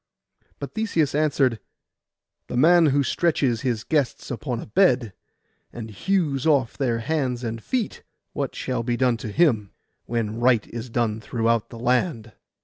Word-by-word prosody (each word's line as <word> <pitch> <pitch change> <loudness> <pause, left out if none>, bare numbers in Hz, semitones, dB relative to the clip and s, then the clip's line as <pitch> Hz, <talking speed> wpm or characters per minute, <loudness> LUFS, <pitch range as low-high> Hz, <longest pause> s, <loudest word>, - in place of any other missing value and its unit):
But - - -7
Theseus 200 -10 0
answered, 140 -6 +2 0.9
'The 125 - -4
man 165 +4 +6
who 140 0 +3
stretches 135 -4 +1
his 120 -4 -1
guests 145 -4 -1
upon 125 -1 -3
a - - -7
bed 125 - +2 0.6
and 110 -2 -8
hews 150 - 0
off 140 -6 +2
their 125 -5 0
hands 130 -3 -1
and 115 -1 -4
feet, 245 -6 -2 0.3
what 140 -2 -3
shall 125 -2 -2
be 120 0 -1
done 125 -2 +2
to 115 - -7
him, 110 - +2 0.3
when 115 -1 -2
right 120 -2 +3
is 120 +1 -6
done 115 -2 -1
throughout 115 0 0
the 115 - -10
land? 120 - 0
125 Hz, 150 wpm, -24 LUFS, 115-145 Hz, 0.9 s, man